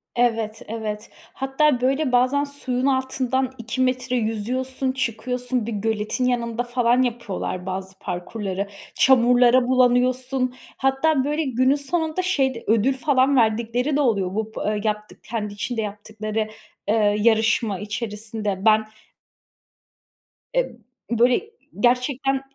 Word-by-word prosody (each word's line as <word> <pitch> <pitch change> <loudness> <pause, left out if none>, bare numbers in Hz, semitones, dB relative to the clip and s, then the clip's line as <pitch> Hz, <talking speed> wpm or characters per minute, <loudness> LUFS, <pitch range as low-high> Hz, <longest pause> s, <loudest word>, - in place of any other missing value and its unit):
Evet, 225 -3 0
evet. 215 -1 -5 0.2
Hatta, 270 0 +1
böyle, 270 +2 +1
bazen 255 +3 +3
suyun 265 -3 -3
altından 260 -1 0
2 240 +2 -3
metre 255 0 0
yüzüyorsun, 250 +4 -1
çıkıyorsun. 250 -1 -2
Bir 230 - -4
göletin 215 +3 -1
yanında 235 -1 0
falan 245 0 +2
yapıyorlar 230 -7 -3
bazı 190 0 -5
parkurları. 195 +2 -4 0.3
Çamurlara 245 -1 +5
bulanıyorsun. 255 0 +2 0.2
Hatta, 270 +2 +2
böyle, 300 +3 0
günün 260 0 +2
sonunda 315 +4 -1
şey 285 -8 +1
de, 230 - -8
ödül 225 +5 +3
falan 265 0 +2
verdikleri 235 +4 +1
de 295 - +2
oluyor 200 -8 +1
bu 220 0 -2
bı 210 0 -1
yaptık 210 -1 -3
kendi 210 -3 -4
içinde 225 +3 -3
yaptıkları, 215 +1 -4 0.4
eee, 210 -1 +3
yarışma 220 -2 +2
içerisinde. 210 -1 -3
Ben 215 0 +5 1.7
E - - +1 0.4
böyle, 245 - +2 0.3
gerçekten 260 +2 +1
245 Hz, 115 wpm, -23 LUFS, 215-260 Hz, 1.7 s, Çamurlara